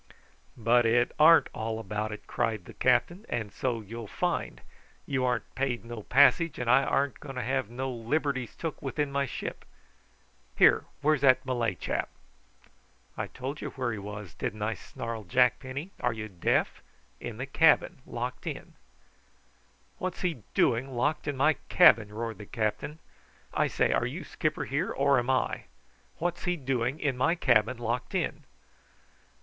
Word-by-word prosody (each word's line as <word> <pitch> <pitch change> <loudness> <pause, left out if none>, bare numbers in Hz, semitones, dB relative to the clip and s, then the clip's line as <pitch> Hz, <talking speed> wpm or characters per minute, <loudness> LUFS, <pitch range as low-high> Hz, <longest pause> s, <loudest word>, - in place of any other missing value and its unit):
"But 120 +2 +4
it 120 +2 +3
arn't 165 +2 +7
all 110 0 -3
about 105 0 -3
it," 105 - -8
cried 110 -5 -1
the - - -11
captain; 150 - +2
"and 110 -4 -3
so 120 -3 -1
you'll 115 +2 -8
find. - - -2 0.5
You 130 -2 -1
arn't 125 -2 -1
paid 130 -4 -2
no 115 -1 -6
passage, 145 - +4
and 125 - -3
I 125 +3 +5
arn't 140 0 0
going 135 -2 -8
to 125 - -2
have 130 -3 -1
no 130 +2 -3
liberties 130 +1 -2
took 165 -3 -5
with 135 +1 -5
my 140 -2 0
ship. - - -6 0.9
Here, - - +6 0.2
where's 150 -1 +3
that 130 -1 +5
Malay 120 -6 0
chap?" 80 - -2 1.1
"I - - -3
told 135 +4 -6
you - - -4
where 125 -3 -2
he 110 - -4
was, 105 -2 -7
didn't 105 +1 -4
I?" 110 +1 0
snarled 115 -5 -7
Jack 125 +4 +4
Penny. 140 +8 -6
"Are 120 - 0
you 110 -1 -5
deaf? 90 -3 0 0.4
In 120 -3 -6
the 130 - -3
cabin, 155 0 +3
locked 125 +2 -5
in." - - -6 1.3
"What's 185 -1 -4
he 170 - -1
doing 125 +2 +2
locked 145 +6 0
in 145 -2 -2
my 155 +3 +3
cabin?" 115 - +6
roared 115 +1 -5
the 105 - -9
captain. 110 +7 -2 0.6
"I - - +2
say, - - +1
are - - +1
you - - -5
skipper - - -2
here, - - -1
or 140 -1 +3
am 120 +1 -3
I? 130 - 0 0.5
What's 175 +2 -2
he 180 -1 0
doing 130 0 -1
in 140 -5 0
my 165 +7 +2
cabin 120 -5 +3
locked 120 +1 -3
in?" - - -2
125 Hz, 165 wpm, -29 LUFS, 115-140 Hz, 1.3 s, arn't